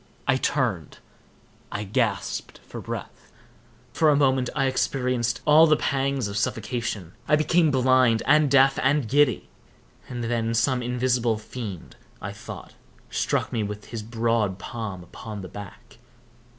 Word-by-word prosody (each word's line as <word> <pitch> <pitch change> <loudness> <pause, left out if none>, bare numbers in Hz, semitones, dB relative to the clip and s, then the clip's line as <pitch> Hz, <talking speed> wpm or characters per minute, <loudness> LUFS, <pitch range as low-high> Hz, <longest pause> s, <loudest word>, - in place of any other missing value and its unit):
I - - +4
turned—I 105 - -4
gasped 100 0 -2
for - - -8
breath. - - -8 0.6
For 160 - +3
a 150 - +5
moment 130 -3 +2
I 135 - +2
experienced 125 -2 0
all 155 +2 +7
the 155 -1 +4
pangs 135 -4 0
of 100 0 -4
suffocation; 110 -6 -3
I 150 - +5
became 160 +2 +3
blind, 130 -3 +3
and 150 +1 +4
deaf, 135 0 +5
and 135 -1 +2
giddy; 140 -1 +2 0.6
and 120 -1 -4
then 115 -1 -1
some 125 +2 +2
invisible 120 -2 +1
fiend, 110 -4 -8 0.2
I - - -5
thought, - - -10 0.4
struck - - -1
me 115 - 0
with 105 0 -5
his 115 -2 -4
broad 115 -3 0
palm 100 -2 -6
upon 105 +3 -8
the - - -6
back. 100 -2 -11
120 Hz, 135 wpm, -25 LUFS, 110-135 Hz, 0.6 s, all